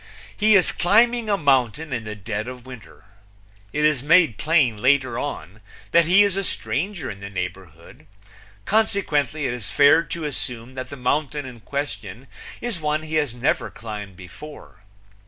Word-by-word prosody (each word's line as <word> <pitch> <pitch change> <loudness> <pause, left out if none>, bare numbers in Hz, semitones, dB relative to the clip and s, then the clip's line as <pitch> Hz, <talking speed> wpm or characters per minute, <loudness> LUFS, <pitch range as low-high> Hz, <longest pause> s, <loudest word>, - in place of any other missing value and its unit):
He 215 0 +4
is 185 - +4
climbing 225 +5 +3
a 200 - +2
mountain 140 - +1
in 115 -3 -3
the 105 0 -5
dead 105 +2 -4
of 125 -1 -9
winter. 125 -5 -13 0.7
It 150 +1 +1
is 150 -4 +2
made 160 - +4
plain 150 -8 +2
later 130 -2 +2
on 105 - -6 0.3
that 170 -1 +5
he 185 +5 +6
is 200 -2 +1
a 195 - -1
stranger 175 - -3
in 100 - -10
the 100 0 -7
neighborhood, 90 -3 -8 0.6
consequently 155 -9 +1
it 125 - -1
is 110 -8 -6
fair 145 +3 +5
to 165 -2 -5
assume 125 -3 -4
that 130 0 -6
the 140 - -8
mountain 145 +3 -1
in 125 -2 -10
question 125 -3 -5 0.4
is 230 -9 -4
one 150 0 -1
he 155 0 -8
has 135 -5 -5
never 120 -2 0
climbed 105 -2 -8
before. 95 - -12
140 Hz, 165 wpm, -23 LUFS, 115-160 Hz, 0.7 s, he